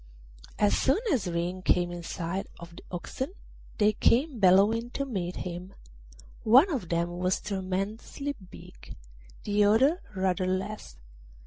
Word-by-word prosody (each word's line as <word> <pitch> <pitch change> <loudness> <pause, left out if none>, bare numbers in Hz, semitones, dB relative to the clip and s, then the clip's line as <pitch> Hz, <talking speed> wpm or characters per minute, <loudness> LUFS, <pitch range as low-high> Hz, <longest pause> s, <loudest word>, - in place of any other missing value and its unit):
As 205 - +3
soon 270 - +3 0.2
as 235 -9 0
Ring 175 +2 -2
came 175 -1 +2
in 175 0 -6
sight 170 +3 -4
of 170 0 -11
the - - -11
oxen 260 - -5 0.4
they 215 -1 +4
came 255 +5 +2
bellowing 205 +5 +4
to 275 - -1
meet 185 -9 -3
him; 180 +2 -6 0.7
one 260 - +6
of 245 - -3
them 170 +1 -1
was 185 +1 +1
tremendously 200 +8 -3 0.2
big, - - -13 0.5
the 205 0 +2
other 260 - +4
rather 185 -1 0
less. 185 - -4
190 Hz, 135 wpm, -28 LUFS, 175-230 Hz, 0.7 s, one